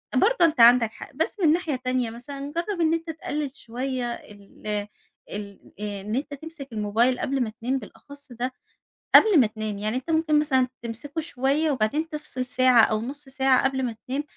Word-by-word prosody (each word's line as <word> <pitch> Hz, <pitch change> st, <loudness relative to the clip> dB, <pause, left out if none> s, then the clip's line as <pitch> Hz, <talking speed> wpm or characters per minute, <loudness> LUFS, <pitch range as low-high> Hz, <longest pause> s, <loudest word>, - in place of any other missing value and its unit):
برضو 440 Hz, -, +4 dB
أنت 310 Hz, -5 st, +1 dB
عندك 235 Hz, -1 st, +7 dB
حق. -, -, -11 dB
بس 320 Hz, +8 st, -2 dB
من 310 Hz, -2 st, +6 dB
ناحية 330 Hz, -4 st, -1 dB
تانية 255 Hz, -2 st, -1 dB
مثلًا 275 Hz, +5 st, -7 dB
جرّب 345 Hz, +2 st, -2 dB
إن 320 Hz, 0 st, +3 dB
أنت 330 Hz, 0 st, -2 dB
تقلل 300 Hz, -3 st, -4 dB
شويّة 255 Hz, +2 st, -4 dB
ال 205 Hz, -1 st, -13 dB, 0.6 s
ال 200 Hz, -1 st, -7 dB, 0.2 s
إن 205 Hz, 0 st, -4 dB
أنت 285 Hz, +2 st, -3 dB
تمسك 315 Hz, 0 st, -9 dB
الموبايل 220 Hz, +4 st, +1 dB
قبل 275 Hz, 0 st, -1 dB
ما 225 Hz, -, -3 dB
تنام 260 Hz, +3 st, 0 dB
بالأخص 285 Hz, +1 st, -14 dB
ده 245 Hz, +2 st, -3 dB, 0.6 s
قبل 420 Hz, -8 st, +8 dB
ما 240 Hz, -, +5 dB
تنام. 215 Hz, -1 st, -5 dB
يعني 215 Hz, +3 st, -2 dB
أنت 260 Hz, +4 st, -4 dB
ممكن 315 Hz, -1 st, +3 dB
مثلًا 265 Hz, -4 st, +2 dB
تمسكُه 240 Hz, +7 st, -5 dB
شويّة 295 Hz, +1 st, 0 dB
وبعدين 280 Hz, +6 st, 0 dB
تفصل 300 Hz, -5 st, -5 dB
ساعة 255 Hz, -1 st, +5 dB
أو 215 Hz, 0 st, +2 dB
نُص 275 Hz, +4 st, -7 dB
ساعة 265 Hz, -1 st, +3 dB
قبل 265 Hz, 0 st, 0 dB
ما 235 Hz, -3 st, -2 dB
تنام 270 Hz, +3 st, -1 dB
260 Hz, 180 wpm, -25 LUFS, 235-300 Hz, 0.6 s, قبل